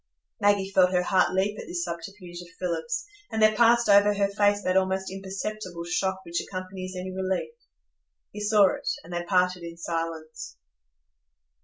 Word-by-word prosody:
Maggie 200 Hz, -2 st, +2 dB
felt 185 Hz, -2 st, +4 dB
her 180 Hz, 0 st, +2 dB
heart 185 Hz, 0 st, +3 dB
leap 200 Hz, +3 st, 0 dB
at -, -, -8 dB
this 175 Hz, -1 st, -2 dB
subterfuge 175 Hz, +1 st, -7 dB
of 175 Hz, -, -11 dB
Philip's, 475 Hz, -, -2 dB, 0.3 s
and 220 Hz, -, -2 dB
there 215 Hz, 0 st, +5 dB
passed 235 Hz, +1 st, +5 dB
over 205 Hz, 0 st, +6 dB
her 200 Hz, 0 st, +1 dB
face 205 Hz, 0 st, +2 dB
that 185 Hz, -, 0 dB
almost 190 Hz, 0 st, +1 dB
imperceptible 195 Hz, -2 st, -5 dB
shock 190 Hz, +2 st, -2 dB
which 170 Hz, 0 st, -2 dB
accompanies 185 Hz, 0 st, -6 dB
any 185 Hz, +1 st, -5 dB
relief. 190 Hz, -, -2 dB, 0.8 s
He 210 Hz, -, -7 dB
saw 210 Hz, -2 st, +4 dB
it, -, -, -4 dB
and 175 Hz, -, -10 dB
they 175 Hz, -, -1 dB
parted 180 Hz, 0 st, +1 dB
in 170 Hz, 0 st, -8 dB
silence. 165 Hz, -, -5 dB
190 Hz, 165 wpm, -26 LUFS, 175-205 Hz, 0.8 s, over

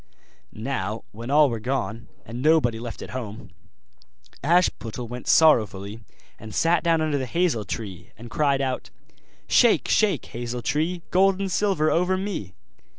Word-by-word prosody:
Now 110 Hz, -2 st, -3 dB
when 115 Hz, +4 st, -8 dB
all 150 Hz, +1 st, +6 dB
were 115 Hz, -, -3 dB
gone, 115 Hz, -1 st, -3 dB, 0.2 s
and 120 Hz, +2 st, -6 dB
nobody 140 Hz, -7 st, +3 dB
left 115 Hz, -1 st, -7 dB
at -, -, -9 dB
home, 110 Hz, -5 st, -7 dB, 0.9 s
Ashputtel 135 Hz, -8 st, +1 dB
went 125 Hz, +1 st, -8 dB
sorrowfully 110 Hz, -9 st, +3 dB, 0.4 s
and 110 Hz, 0 st, -9 dB
sat 165 Hz, +1 st, +2 dB
down 165 Hz, -2 st, +2 dB
under 155 Hz, -2 st, 0 dB
the 130 Hz, -, -3 dB
hazel 160 Hz, -, 0 dB
tree, 95 Hz, -2 st, -6 dB
and 120 Hz, +3 st, -10 dB
cried 140 Hz, -1 st, +1 dB
out: 130 Hz, -2 st, -3 dB, 0.6 s
'Shake, 240 Hz, -3 st, +4 dB
shake, 200 Hz, -, +2 dB
hazel 120 Hz, 0 st, -5 dB
tree, 160 Hz, +9 st, -1 dB
Gold 190 Hz, +1 st, +4 dB
and 195 Hz, -1 st, -2 dB
silver 185 Hz, -6 st, +1 dB
over 180 Hz, +2 st, +2 dB
me! 185 Hz, -, -5 dB
135 Hz, 150 wpm, -24 LUFS, 115-165 Hz, 0.9 s, all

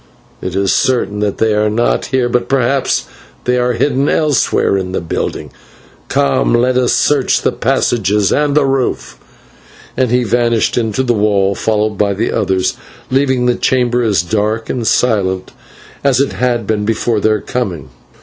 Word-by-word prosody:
It 95 Hz, -, -5 dB
is 95 Hz, 0 st, +1 dB
certain 120 Hz, -5 st, 0 dB
that 105 Hz, -1 st, -1 dB
they 110 Hz, -1 st, +1 dB
are 105 Hz, 0 st, +1 dB
not 115 Hz, +3 st, 0 dB
here, 130 Hz, -2 st, 0 dB
but 120 Hz, 0 st, -1 dB
perhaps 135 Hz, 0 st, +1 dB, 0.4 s
they 125 Hz, 0 st, +1 dB
are 125 Hz, 0 st, +1 dB
hidden 135 Hz, +2 st, 0 dB
elsewhere 150 Hz, -9 st, +1 dB
in 95 Hz, -1 st, -3 dB
the -, -, -1 dB
building. 85 Hz, -, -4 dB, 0.6 s
Come, 65 Hz, -3 st, +1 dB
let 125 Hz, +2 st, +2 dB
us 125 Hz, -1 st, +2 dB
search 145 Hz, -3 st, +1 dB
the -, -, +2 dB
passages 105 Hz, -3 st, 0 dB
and 145 Hz, -1 st, +1 dB
the 145 Hz, -, +4 dB
roof," 135 Hz, -2 st, -2 dB, 0.8 s
and 130 Hz, -2 st, +1 dB
he 125 Hz, +1 st, +2 dB
vanished 115 Hz, 0 st, +1 dB
into 115 Hz, +1 st, 0 dB
the 120 Hz, -2 st, +1 dB
wall, 100 Hz, -2 st, +1 dB
followed 105 Hz, 0 st, -1 dB
by 100 Hz, -1 st, +1 dB
the 110 Hz, +4 st, -1 dB
others, 95 Hz, -1 st, 0 dB, 0.4 s
leaving 130 Hz, -2 st, +1 dB
the 125 Hz, -, +3 dB
chamber 125 Hz, -1 st, +1 dB
as 100 Hz, -7 st, +1 dB
dark 110 Hz, +4 st, -1 dB
and 120 Hz, -3 st, -3 dB
silent 95 Hz, -6 st, 0 dB, 0.5 s
as 135 Hz, -3 st, +2 dB
it 140 Hz, -, 0 dB
had 120 Hz, -3 st, -1 dB
been 105 Hz, 0 st, -1 dB
before 115 Hz, +1 st, 0 dB
their 110 Hz, +1 st, +1 dB
coming. 95 Hz, -, -4 dB
115 Hz, 165 wpm, -15 LUFS, 105-125 Hz, 0.8 s, the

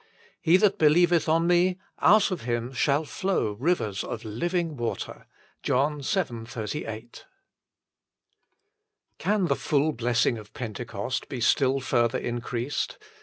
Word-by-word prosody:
"He 170 Hz, +2 st, +5 dB
that 200 Hz, 0 st, +2 dB
believeth 170 Hz, +2 st, +4 dB
on 165 Hz, +1 st, +3 dB
Me, 175 Hz, +1 st, +3 dB, 0.2 s
out 205 Hz, +1 st, +5 dB
of 185 Hz, -, -3 dB
him 120 Hz, +1 st, -2 dB
shall 145 Hz, +4 st, +1 dB
flow 185 Hz, -, -1 dB
rivers 110 Hz, -, -1 dB
of 115 Hz, 0 st, -6 dB
living 165 Hz, -, -2 dB
water." 120 Hz, -3 st, -5 dB, 0.3 s
JOHN 145 Hz, +3 st, +1 dB
vii. 135 Hz, -, -1 dB
38. 115 Hz, -1 st, -6 dB, 1.9 s
the 185 Hz, -6 st, +1 dB
full 150 Hz, +2 st, +1 dB
blessing 120 Hz, -2 st, +1 dB
of 105 Hz, 0 st, -14 dB
Pentecost 120 Hz, +2 st, -4 dB
be 135 Hz, -3 st, -4 dB
still 135 Hz, +3 st, +3 dB
further 120 Hz, -3 st, +1 dB
increased 120 Hz, +2 st, -3 dB
135 Hz, 120 wpm, -26 LUFS, 120-170 Hz, 1.9 s, He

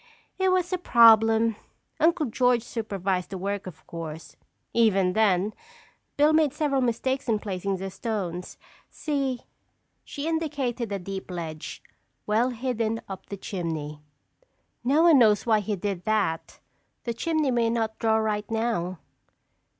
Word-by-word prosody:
"It 380 Hz, 0 st, +3 dB
was 370 Hz, 0 st, +1 dB
a 365 Hz, -, 0 dB
problem. 225 Hz, -, +5 dB, 0.4 s
Uncle 325 Hz, -1 st, +3 dB
George 245 Hz, -1 st, +2 dB
supervised 195 Hz, -6 st, -2 dB
the 195 Hz, -, -5 dB
work, 200 Hz, +1 st, -3 dB
of 180 Hz, -, -11 dB
course. 165 Hz, -1 st, -8 dB, 0.4 s
Even 195 Hz, -5 st, +3 dB
then, 205 Hz, -1 st, +2 dB, 0.6 s
Bill 300 Hz, +2 st, +5 dB
made 310 Hz, -3 st, +3 dB
several 290 Hz, -3 st, +1 dB
mistakes 260 Hz, +2 st, -1 dB
in 220 Hz, -, +3 dB
placing 195 Hz, -1 st, -3 dB
the 190 Hz, +1 st, -5 dB
stones. 180 Hz, -5 st, -4 dB, 0.3 s
See—" 275 Hz, -4 st, -2 dB, 0.6 s
she 285 Hz, +2 st, -5 dB
indicated 280 Hz, -8 st, -2 dB
a 200 Hz, -, -1 dB
deep 195 Hz, +1 st, -6 dB
ledge, 165 Hz, -3 st, -6 dB, 0.4 s
well 225 Hz, +4 st, +2 dB
hidden 230 Hz, -2 st, -2 dB
up 190 Hz, -1 st, -8 dB
the 200 Hz, -, -6 dB
chimney. 160 Hz, -6 st, -4 dB, 0.8 s
"No 285 Hz, +6 st, +3 dB
one 330 Hz, -5 st, +7 dB
knows 210 Hz, -4 st, +4 dB
why 220 Hz, -2 st, +4 dB
he 210 Hz, 0 st, -2 dB
did 195 Hz, -1 st, -4 dB
that. 205 Hz, -7 st, -1 dB, 0.4 s
The 235 Hz, -, -2 dB
chimney 310 Hz, +2 st, 0 dB
may 235 Hz, -2 st, +2 dB
not 225 Hz, -1 st, -1 dB
draw 220 Hz, -1 st, +3 dB
right 210 Hz, -1 st, -1 dB
now." 220 Hz, -6 st, -1 dB
220 Hz, 140 wpm, -26 LUFS, 195-255 Hz, 0.8 s, one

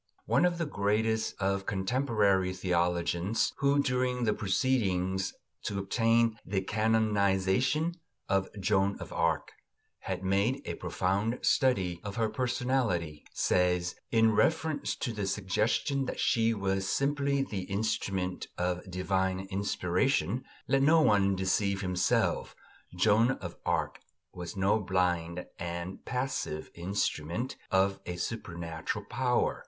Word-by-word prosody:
One 130 Hz, +9 st, +3 dB
of 175 Hz, -1 st, +1 dB
the 170 Hz, -, -1 dB
greatest 110 Hz, -2 st, 0 dB
of 100 Hz, 0 st, 0 dB
contemporary 100 Hz, -3 st, +1 dB
theologians, 90 Hz, +2 st, 0 dB
who 140 Hz, 0 st, +3 dB
during 125 Hz, -1 st, 0 dB
the 110 Hz, -2 st, +2 dB
proceedings 95 Hz, -4 st, 0 dB, 0.3 s
to 100 Hz, -, -2 dB
obtain 115 Hz, +3 st, +2 dB
the 95 Hz, 0 st, -1 dB
canonisation 110 Hz, -, +2 dB, 0.3 s
of 95 Hz, -1 st, +1 dB
Joan 100 Hz, 0 st, +2 dB
of -, -, -8 dB
Arc -, -, 0 dB, 0.5 s
had -, -, -4 dB
made 100 Hz, +9 st, +1 dB
a -, -, -3 dB
profound 95 Hz, +6 st, -1 dB
study 95 Hz, -, +2 dB
of 100 Hz, -1 st, -5 dB
her 115 Hz, -1 st, +1 dB
personality, 120 Hz, -, -1 dB
says, 90 Hz, 0 st, +1 dB, 0.2 s
in 115 Hz, -1 st, +4 dB
reference 160 Hz, +6 st, +1 dB
to 120 Hz, -, -3 dB
the 105 Hz, -2 st, -3 dB
suggestion 105 Hz, +8 st, 0 dB
that -, -, -5 dB
she 115 Hz, -2 st, +3 dB
was 95 Hz, -3 st, -1 dB
simply 140 Hz, 0 st, +1 dB
the 100 Hz, -8 st, -4 dB
instrument 100 Hz, -2 st, -2 dB
of 90 Hz, +2 st, -2 dB
divine 95 Hz, +1 st, 0 dB
inspiration: 100 Hz, -, 0 dB, 0.2 s
"Let 135 Hz, 0 st, +3 dB
no 160 Hz, +3 st, +5 dB
one 100 Hz, -5 st, +4 dB
deceive 100 Hz, +1 st, 0 dB
himself. 90 Hz, -2 st, 0 dB, 0.4 s
Joan 110 Hz, +7 st, +4 dB
of 85 Hz, -9 st, -7 dB
Arc -, -, 0 dB, 0.3 s
was 90 Hz, 0 st, -7 dB
no 100 Hz, +3 st, +3 dB
blind 90 Hz, -2 st, 0 dB
and 85 Hz, +2 st, -5 dB
passive 125 Hz, -, -3 dB
instrument 90 Hz, -, -2 dB
of 95 Hz, +1 st, +2 dB
a 90 Hz, -, -3 dB
supernatural 85 Hz, 0 st, -4 dB
power. 125 Hz, +3 st, 0 dB
100 Hz, 120 wpm, -30 LUFS, 95-115 Hz, 0.5 s, no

